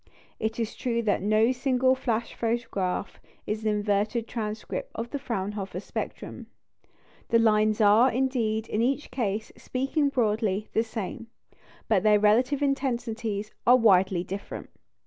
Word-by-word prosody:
It 220 Hz, +1 st, -2 dB
is 225 Hz, -1 st, -2 dB
true 235 Hz, -2 st, -1 dB
that 205 Hz, -4 st, +1 dB
no 215 Hz, +4 st, +3 dB
single 260 Hz, 0 st, +2 dB
"flash" 235 Hz, -3 st, -2 dB
photograph 225 Hz, -6 st, -2 dB, 0.3 s
is 215 Hz, +1 st, -2 dB
an 220 Hz, -, +1 dB
inverted 210 Hz, +2 st, 0 dB
transcript 230 Hz, -, -4 dB
of 230 Hz, +1 st, -5 dB
the 285 Hz, -, -3 dB
Fraunhofer 200 Hz, -6 st, -4 dB
spectrum. -, -, -6 dB, 0.8 s
The 230 Hz, -, +5 dB
lines 215 Hz, -1 st, +3 dB
are, 215 Hz, +5 st, +6 dB
indeed, 230 Hz, -4 st, 0 dB
in 215 Hz, -, -1 dB
each 270 Hz, +5 st, 0 dB
case 220 Hz, -4 st, -2 dB
speaking 275 Hz, +3 st, 0 dB
broadly 215 Hz, -5 st, 0 dB
the 225 Hz, -, +3 dB
same; 230 Hz, +1 st, -5 dB, 0.6 s
but 205 Hz, -4 st, +3 dB
their 210 Hz, -1 st, +5 dB
relative 250 Hz, +7 st, +3 dB
intensities 235 Hz, -6 st, -2 dB, 0.2 s
are 250 Hz, +1 st, +8 dB
widely 190 Hz, -5 st, +4 dB
different. 195 Hz, +2 st, -7 dB
225 Hz, 135 wpm, -27 LUFS, 210-250 Hz, 0.8 s, are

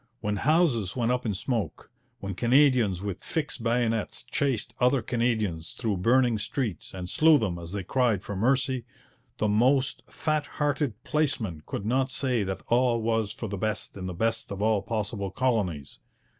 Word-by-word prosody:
When 105 Hz, -2 st, -1 dB
houses 130 Hz, -, +2 dB
went 120 Hz, -1 st, +1 dB
up 125 Hz, -1 st, -1 dB
in 105 Hz, -, -1 dB
smoke, 115 Hz, +3 st, -3 dB, 0.3 s
when 100 Hz, 0 st, -4 dB
Canadians 120 Hz, -4 st, +3 dB
with 100 Hz, -2 st, -4 dB
fixed 150 Hz, -5 st, -3 dB
bayonets 115 Hz, -2 st, 0 dB
chased 135 Hz, -, -1 dB
other 125 Hz, 0 st, +3 dB
Canadians 110 Hz, -9 st, -1 dB
through 110 Hz, -5 st, -1 dB
burning 120 Hz, +3 st, +3 dB
streets 105 Hz, -, -3 dB
and 90 Hz, -1 st, -5 dB
slew 155 Hz, -, +5 dB
them 95 Hz, -9 st, -2 dB
as 85 Hz, 0 st, -7 dB
they 100 Hz, -1 st, -3 dB
cried 115 Hz, -2 st, +1 dB
for 100 Hz, -, -5 dB
mercy, 130 Hz, +4 st, +1 dB, 0.5 s
the 105 Hz, -, +1 dB
most 130 Hz, +6 st, +2 dB
fat 155 Hz, -2 st, -1 dB
hearted 145 Hz, -6 st, -1 dB
place 150 Hz, -2 st, +1 dB
man 90 Hz, -9 st, -5 dB
could 100 Hz, -, -4 dB
not 130 Hz, +4 st, +1 dB
say 130 Hz, -3 st, 0 dB
that 95 Hz, -1 st, -3 dB
all 120 Hz, 0 st, +3 dB
was 110 Hz, -2 st, 0 dB
for 115 Hz, 0 st, -5 dB
the 100 Hz, -1 st, -4 dB
best 110 Hz, +1 st, -2 dB
in 95 Hz, -2 st, -5 dB
the 90 Hz, -, -5 dB
best 115 Hz, +5 st, -1 dB
of 100 Hz, -, -4 dB
all 110 Hz, -1 st, +2 dB
possible 105 Hz, -2 st, -3 dB
colonies. 95 Hz, -, -1 dB
115 Hz, 170 wpm, -27 LUFS, 100-130 Hz, 0.5 s, slew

